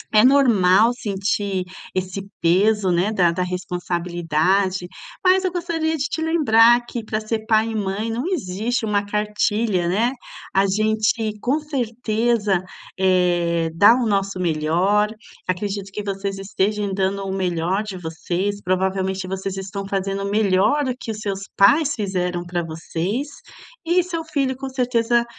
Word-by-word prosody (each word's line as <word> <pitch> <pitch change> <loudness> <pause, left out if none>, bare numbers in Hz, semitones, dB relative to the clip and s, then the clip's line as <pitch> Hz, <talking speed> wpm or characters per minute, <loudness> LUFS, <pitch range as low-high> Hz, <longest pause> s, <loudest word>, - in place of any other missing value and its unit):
É 215 - +7
normal 230 -6 +5
sentir 200 -4 -2 0.3
esse 185 +1 -2 0.2
peso, 195 +3 +3
né, 180 +5 +1
da 175 -5 +3
da 180 - -3
responsabilidade, 180 0 -1 0.4
mas 370 +1 +5
eu 370 - 0
gostaria 330 -2 -1
de 275 - -1
te 320 - -3
lembrar 240 -8 +5
que 235 - -5
para 215 0 -2
ser 220 0 -3
pai 220 0 +3
e - - -4
mãe 210 +2 -2
não 240 +4 -2
existe 235 - -2
uma 205 -1 +1
cartilha, 210 -2 0
né. 225 +7 +2 0.4
A 195 +1 +3
gente 215 +2 +1
com 280 +5 +1
certeza, 235 - 0 0.4
eh, 175 -3 +2
dá 205 +7 +6
o 250 - 0
nosso 195 -3 0
melhor. 180 +5 +1 0.4
Acredito 195 +1 -3
que 210 +1 -5
vocês 195 0 -3
estejam 200 +1 -1
dando 195 +1 -1
o 190 - -3
melhor 180 +1 0
de 200 -3 -6
vocês, 180 +5 -3
provavelmente 190 +1 -1
vocês 190 0 -4
estão 195 +1 -5
fazendo 195 0 -2
o 200 - -2
melhor 210 +7 +2
do 255 - -1
que 230 - -8
os 215 - -6
seus 195 -2 -3 0.2
pais 290 +9 +5
fizeram 180 -4 -2
para 175 0 -2
vocês, 170 - -3 0.6
e 350 +2 +3
seu 335 -2 -4
filho, 275 -4 -1
com 270 +1 -6
certeza, 240 -2 +1
200 Hz, 150 wpm, -21 LUFS, 185-230 Hz, 0.6 s, É